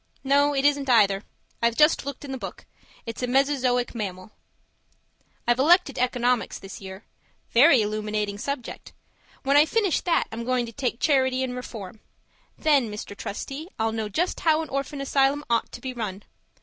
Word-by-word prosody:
No, 285 +1 +3
it 270 0 +1
isn't 285 -2 +2
either; 200 -5 +4 0.4
I've 235 0 +2
just 300 -2 +4
looked 280 +1 -6
in 275 - -7
the 265 - -3
book. - - -8 0.4
It's 230 +1 -6
a 250 - -1
mesozoic 255 -2 +1
mammal. 195 -3 -5 1.2
I've 240 +1 +3
elected 320 -1 +4
economics 245 -1 0
this 195 +1 -10
year 190 +1 -9 0.5
very 255 -1 +6
illuminating 210 -1 -2
subject. 280 0 -5 0.5
When 275 +1 +2
I 300 +2 +6
finish 410 -3 +1
that 345 - +2
I'm 230 +1 -5
going 250 0 0
to 230 - -9
take 245 -1 -2
Charity 260 -3 +2
and 250 -1 -3
Reform; 220 -5 -8 0.6
then, 285 -7 +3
Mr. 210 -1 -7
Trustee, 275 - -6
I'll 225 0 0
know 220 -1 -3
just 350 - -1
how 320 -1 +2
an 315 - -9
orphan 275 +1 -3
asylum 275 +1 +1
ought 230 - +1
to 240 - -9
be 260 0 -5
run. 210 -4 -5
250 Hz, 170 wpm, -25 LUFS, 220-280 Hz, 1.2 s, very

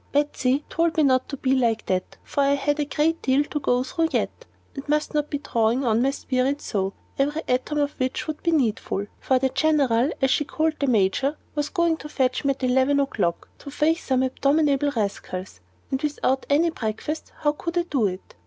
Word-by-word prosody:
Betsy 285 -1 +1
told 330 0 0
me 310 - +4
not 260 -2 +2
to 280 - -4
be 260 0 +1
like 230 -4 +1
that, 185 -1 -2
for 285 - -1
I 280 0 +3
had 290 +1 0
a 295 - +1
great 305 +3 0
deal 270 +2 +3
to 295 0 -4
go 250 -2 +1
through 325 +4 -1
yet, - - -2 0.3
and 275 0 -8
must 300 0 +1
not 295 0 0
be 290 - -1
drawing 235 -1 0
on 225 -1 +2
my 265 - +3
spirit 275 0 -1
so, 195 -6 -2 0.3
every 295 +4 0
atom 255 +4 0
of 290 -1 +1
which 255 0 -1
would 310 -1 -5
be 340 - 0
needful. 225 -9 0
For 260 - +2
the 265 +1 +1
General 270 -3 +2
as 265 -2 +2
she - - +2
called 310 +1 -1
the 280 - 0
Major 245 +6 +2 0.2
was 295 -1 -1
coming 340 -3 +1
to 300 - -9
fetch 260 -3 0
me 275 -1 +2
at 265 - -13
eleven 260 +3 +3
o'clock 210 -11 -1
to 285 - -9
face 315 +4 +1
some 260 -1 +1
abominable 280 +2 +2
rascals, 190 - -4 0.3
and 265 0 -1
without 285 -3 0
any 320 +4 +3
breakfast 245 +5 -4
how 295 - +3
could 335 +3 -5
I 345 - +3
do 270 -10 +1
it? 185 0 -7
275 Hz, 210 wpm, -24 LUFS, 255-300 Hz, 0.3 s, me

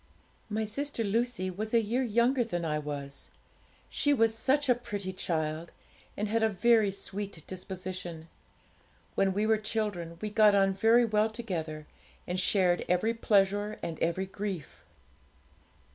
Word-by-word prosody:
'My 220 +1 -1
sister 275 +3 -2
Lucy 220 -2 0
was 215 +5 -3
a - - +7
year 230 +4 0
younger 240 +2 +2
than 175 -7 -3
I 150 -1 0
was. 145 -2 -6 0.6
She 290 -1 +2
was 225 -2 +3
such 275 +5 +1
a 250 - +6
pretty 205 -6 -5
child, 160 -2 -2 0.5
and 210 - -1
had 225 +2 +1
a 220 - +4
very 220 +1 +4
sweet 195 -3 -6
disposition. 185 -3 -6 0.9
When 195 -1 +2
we 205 +3 0
were 220 0 +3
children 205 -6 -3
we 210 +2 -4
got 210 -1 +5
on 195 -1 +4
very 225 +5 +4
well 215 0 +2
together, 165 -9 -5 0.4
and 180 +1 -2
shared 185 -2 +2
every 180 +6 +2
pleasure 205 -1 +2
and 165 -2 -4
every 170 +3 0
grief. 190 -4 -6
205 Hz, 145 wpm, -30 LUFS, 180-225 Hz, 0.9 s, a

